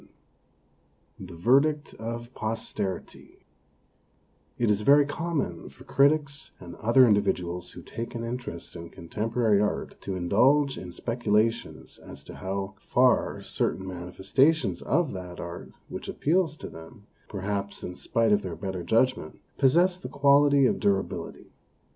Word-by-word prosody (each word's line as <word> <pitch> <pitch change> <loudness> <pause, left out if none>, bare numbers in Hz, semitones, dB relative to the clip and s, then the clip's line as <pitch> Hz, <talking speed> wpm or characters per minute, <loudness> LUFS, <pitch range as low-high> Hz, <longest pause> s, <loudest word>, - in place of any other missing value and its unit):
XXI - - -8
THE - - -10
VERDICT 140 - +2
OF 115 +2 -6
POSTERITY 110 -5 -5 1.1
IT 115 -3 +2
is 105 0 +1
very 140 +5 +6
common 145 - -3
for - - -16
critics 140 0 +2
and 85 -2 -10
other 120 +4 +5
individuals 90 -5 0
who - - -10
take 115 +1 -6
an 115 - -4
interest 115 -9 -5
in 85 0 -8
contem 105 +8 -5
porary 110 -4 +3
art 105 - -2
to 95 - -4
indulge 130 +11 +3
in 90 -1 -8
speculations 115 +1 -1
as - - -11
to - - -10
how 95 +1 -4
far 125 +4 +2
certain 95 - -1
manifestations 95 - +1
of 165 -4 +1
that 90 -2 -7
art, 85 0 -7 0.2
which - - -7
appeals 160 -1 +1
to - - -7
them, 90 +7 -12 0.2
perhaps, 100 0 -4
in 90 - -5
spite 115 +4 0
of 105 0 +4
their 90 -4 -5
better 95 -3 -4
judgment, 115 -3 +1 0.2
possess 175 +7 +4
the - - -7
quality 140 0 +5
of - - +1
durability. 100 -1 -2
115 Hz, 140 wpm, -27 LUFS, 95-140 Hz, 1.1 s, very